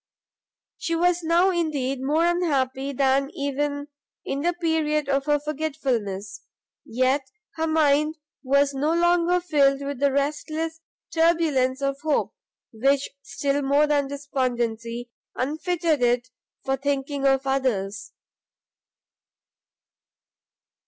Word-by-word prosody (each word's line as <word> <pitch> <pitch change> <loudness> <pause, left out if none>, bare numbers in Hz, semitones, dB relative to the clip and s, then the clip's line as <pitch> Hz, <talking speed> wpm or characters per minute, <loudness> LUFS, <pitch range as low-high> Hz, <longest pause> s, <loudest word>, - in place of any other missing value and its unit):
She 335 - -1
was 350 +1 +2
now 340 +3 +3
indeed 285 -7 -1
more 305 +5 +2
unhappy 280 -6 0
than 275 0 +2
even 285 +1 -2 0.4
in 275 +1 -2
the 350 +3 +1
period 320 -4 0
of 275 0 0
her 295 -1 +2
forgetfulness, 270 -10 -3 0.4
yet 260 +3 0 0.3
her 320 0 0
mind, 305 0 +2 0.2
was 280 +1 +2
no 295 +4 0
longer 345 +1 +3
filled 280 -5 +2
with 280 -2 -4
the 280 0 +3
restless 310 +3 -2 0.3
turbulence 310 -6 +2
of 275 0 -1
hope, 310 -2 0 0.4
which 275 +5 +1
still 275 +3 -1
more 285 +2 +3
than 290 -2 +1
despondency 240 -4 -3 0.2
unfitted 315 +2 0
it 245 +1 +2 0.4
for 270 0 0
thinking 275 0 -1
of 270 0 +2
others. 210 -7 -1
280 Hz, 110 wpm, -24 LUFS, 265-315 Hz, 0.4 s, now